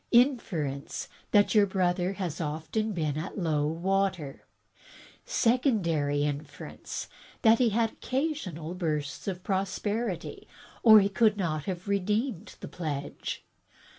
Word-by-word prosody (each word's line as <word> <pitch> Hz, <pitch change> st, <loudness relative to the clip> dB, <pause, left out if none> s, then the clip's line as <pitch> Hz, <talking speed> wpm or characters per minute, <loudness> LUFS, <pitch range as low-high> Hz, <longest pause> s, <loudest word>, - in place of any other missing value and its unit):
Inference 195 Hz, -, +1 dB, 0.2 s
that 205 Hz, -1 st, +4 dB
your 210 Hz, -2 st, +5 dB
brother 185 Hz, 0 st, 0 dB
was 175 Hz, -4 st, -3 dB
often 160 Hz, +7 st, -2 dB, 0.2 s
at 170 Hz, +7 st, -6 dB
low 155 Hz, -5 st, +1 dB
water. 180 Hz, -2 st, -1 dB, 0.8 s
Secondary 190 Hz, -, +2 dB
inference 145 Hz, +1 st, -5 dB, 0.2 s
— -, -, -24 dB
that 225 Hz, -1 st, +6 dB
he 245 Hz, -2 st, +4 dB
had 225 Hz, +1 st, +1 dB
occasional 250 Hz, -, -3 dB
bursts 155 Hz, -5 st, -3 dB
of 185 Hz, -2 st, -3 dB
prosperity, 195 Hz, +1 st, -2 dB, 0.3 s
or 220 Hz, -2 st, +9 dB
he 195 Hz, -, +2 dB
could 215 Hz, +1 st, +3 dB
not 155 Hz, -6 st, -1 dB
have 185 Hz, 0 st, -4 dB
redeemed 210 Hz, +2 st, -1 dB
the -, -, -6 dB
pledge. 145 Hz, -5 st, -5 dB
190 Hz, 115 wpm, -29 LUFS, 155-220 Hz, 0.8 s, or